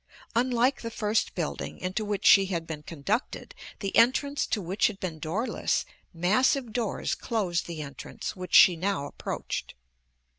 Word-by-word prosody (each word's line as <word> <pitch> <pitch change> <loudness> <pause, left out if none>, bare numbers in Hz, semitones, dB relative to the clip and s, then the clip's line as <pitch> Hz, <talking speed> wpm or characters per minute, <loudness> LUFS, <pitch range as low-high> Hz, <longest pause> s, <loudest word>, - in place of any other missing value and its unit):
Unlike 250 +2 +2
the 230 - -4
first 215 -1 -1
building 165 -4 -4
into 185 +4 -3
which 205 -1 -3
she 195 -1 +7
had 170 -3 -2
been 160 -2 -6
conducted, 165 - -3 0.3
the 195 -2 -3
entrance 275 +5 +3
to - - 0
which 190 +2 +1
had 200 -3 -6
been 165 -4 -4
doorless, 185 +11 -1 0.3
massive 220 - +2
doors 230 -4 -1
closed 185 -7 -1
the 165 -3 -5
entrance 140 -1 -7
which 185 -1 -3
she 180 - +9
now 185 -3 -1
approached. - - -5
195 Hz, 150 wpm, -27 LUFS, 170-230 Hz, 0.3 s, she